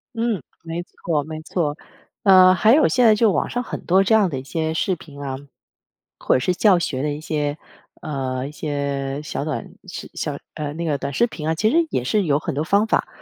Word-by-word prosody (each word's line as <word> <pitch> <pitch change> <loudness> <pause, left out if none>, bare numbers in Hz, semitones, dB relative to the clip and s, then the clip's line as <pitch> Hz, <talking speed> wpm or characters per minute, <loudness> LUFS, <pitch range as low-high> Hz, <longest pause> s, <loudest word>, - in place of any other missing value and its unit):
嗯， 230 -5 -1 0.2
没 165 +1 -4
错 160 -4 -2
没 155 +1 -7
错。 155 -2 -2 0.5
呃， 185 -2 +7
还 215 +5 +4
有 310 - +5
现 250 -1 +3
在 220 -1 +7
就 215 0 +3
网 - - 0
上 245 +1 -2
很 - - -7
多 190 +2 +4
这 205 - +2
样 210 -4 +4
的 140 - -4
一 - - -9
些 160 +3 -2
视 185 +4 0
频 145 -3 -12
啊， 135 -2 -4 0.8
或 - - +2
者 - - +3
是 180 +8 +1
教 190 0 +4
学 140 -6 -2
的 150 - 0
一 150 - -7
些， 150 -2 -2 0.4
呃， 130 -3 -3
一 - - -8
些 140 -2 -3
小 150 - -4
短 155 - -3 0.5
小 - - -3 0.2
呃， 150 -1 -4
那 165 +2 -4
个 155 -4 0
短 140 - -4
视 235 - +3
频 155 -9 -6
啊， 160 - +1
其 215 +6 +2
实 330 +1 +3
也 125 - -1
是 205 +11 +1
有 145 -5 +2
很 - - -4
多 140 - -1
方 200 +6 +3
法， - - +1
160 Hz, 240 characters per minute, -22 LUFS, 145-195 Hz, 0.8 s, 呃